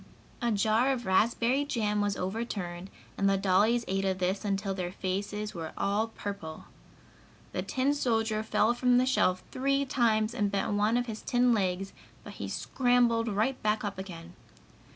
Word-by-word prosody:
A 240 -1 +1
jar 220 +5 +2
of 245 -3 -2
raspberry 235 +7 +2
jam 210 -7 0
was 205 -1 0
overturned 190 -3 -4 0.3
and 195 - +3
the 195 - +3
dollies 205 +5 +3
ate 195 +1 0
of 190 -1 0
this 185 +3 -1
until 195 -1 -1
their 180 -2 -3
faces 205 +3 -3
were 165 -3 -6
all 205 +3 +1
purple. 200 -7 -7 0.9
The - - -2
tin 270 +2 0
soldier 225 -5 0
fell 220 +1 +2
from 245 0 +3
the 250 - +4
shelf 185 -8 +2
three 275 +2 +1
times 225 -4 +1
and 210 -4 0
bent 200 +1 -1
one 210 +3 +2
of 245 - 0
his 220 -2 -6
tin 245 0 +3
legs, 195 -2 -1 0.3
but - - -9
he - - -6
scrambled 245 -2 +2
right 220 +5 0
back 215 0 0
up 200 -2 -4
again. 175 -2 -8
215 Hz, 170 wpm, -29 LUFS, 195-240 Hz, 0.9 s, the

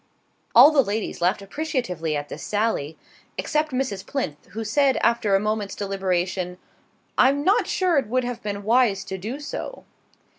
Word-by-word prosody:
All 265 +6 +10
the 295 -3 +5
ladies 215 -5 -3
laughed 185 +3 +1
appreciatively 195 - -2
at 145 0 -5
this - - -8
sally, 205 -8 -1 0.4
except 305 0 0
Mrs. 255 -7 -2
Plinth, 205 - -4
who 225 - -4
said, 270 +5 +2
after 220 -4 +3
a - - +4
moment's 210 -1 -2
deliberation: 185 -2 -2 0.6
"I'm 275 +3 +4
not 385 +5 +3
sure 360 -6 +2
it 265 - -4
would 255 +3 0
have 245 -1 -4
been 205 -1 -4
wise 220 -3 +3
to 190 -1 -6
do 230 +9 -5
so." 300 +11 -6
215 Hz, 160 wpm, -24 LUFS, 195-265 Hz, 0.6 s, All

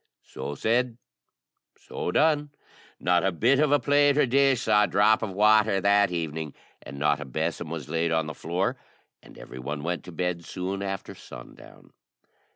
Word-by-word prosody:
So 70 - -7
said, 115 - 0 0.8
so - - -6
done. 150 - +2 0.5
Not 90 0 +2
a 95 - +1
bit 120 - +2
of 150 -1 +2
a 145 - +4
plate 145 +1 +3
or 150 - +4
dish 135 0 +2
saw 105 -2 +4
a - - -4
drop 105 +2 +3
of 110 - -3
water 105 +1 +3
that 100 +1 +3
evening, 80 -3 -4 0.3
and 70 - -10
not 75 0 +1
a 75 - -6
besom 80 +4 -3
was 80 -5 -6
laid 85 0 -1
on 80 -1 +1
the 80 - -6
floor, 85 +6 -2 0.4
and - - -17
every 65 - -10
one 70 +3 -5
went 85 +1 -3
to 90 - -9
bed 90 0 -3
soon 95 +3 -5
after 95 -1 -5
sundown. - - -14
95 Hz, 175 wpm, -26 LUFS, 80-115 Hz, 0.8 s, a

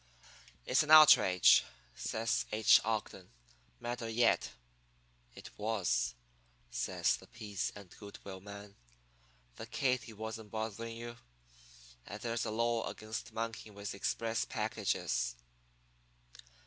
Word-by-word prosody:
"'It's - - +3
an 150 - -3
outrage,' 155 - +8 0.3
says 115 +1 -1
H. 110 -1 +6
Ogden, 105 -4 -3 0.5
madder 120 -1 -4
yet. 115 +1 +2 0.9
"'It - - -10
was,' 85 - 0 0.6
says - - 0
the - - -16
peace 105 -4 -4
and 100 -3 -12
good 100 -1 -10
will 95 -1 -8
man. 100 0 -10 0.8
'The - - -7
Katy 125 -4 -1
wasn't 110 0 -7
bothering 115 +1 -5
you, 120 0 -7 0.9
and 100 - -7
there's 115 -1 -1
a - - -2
law 115 +1 0
against 110 0 -6
monkeying 115 -2 -5
with 100 0 -5
express 115 +3 -1
packages.' - - -1
110 Hz, 110 wpm, -33 LUFS, 100-115 Hz, 0.9 s, outrage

